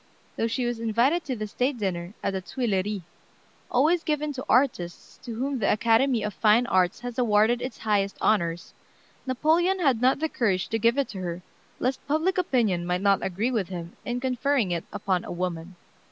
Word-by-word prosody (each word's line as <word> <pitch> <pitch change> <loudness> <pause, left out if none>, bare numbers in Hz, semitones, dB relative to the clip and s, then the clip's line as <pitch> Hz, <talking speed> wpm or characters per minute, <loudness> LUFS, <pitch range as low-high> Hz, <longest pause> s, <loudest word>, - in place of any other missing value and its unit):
Though 225 - 0
she 245 +2 -1
was 240 -1 -2
invited 235 +9 +2
to 260 - -2
the 215 -2 -4
state 250 +5 -1
dinner 185 -2 -3
at 200 - 0
the 190 - -2
Tuileries, 205 -3 -2 0.7
always 315 +7 +3
given 300 -1 -1
to 260 -1 -5
artists 240 -10 0
to 235 -3 -6
whom 265 +3 -2
the 200 - +2
Academy 230 +2 +3
of 210 -1 -3
Fine 220 +4 +4
Arts 185 -6 +1
has 245 0 -5
awarded 225 +1 +3
its 255 - -5
highest 200 -2 0
honors, 175 -5 0 0.5
Napoleon 320 +8 +2
had 270 -9 +2
not 260 +2 +4
the 320 +3 -1
courage 200 - 0
to 225 - -1
give 230 +4 +3
it 280 - +1
to 195 - -7
her, 175 -1 -5 0.3
lest 260 +1 -2
public 320 +6 +1
opinion 225 - +1
might 180 +1 -1
not 200 -1 +3
agree 205 +7 -1
with 210 -7 -1
him 170 -2 -7
in 245 0 -2
conferring 255 -4 0
it 170 -1 -2
upon 195 -3 -1
a - - -7
woman. 175 0 -4
230 Hz, 190 wpm, -26 LUFS, 190-260 Hz, 0.7 s, Fine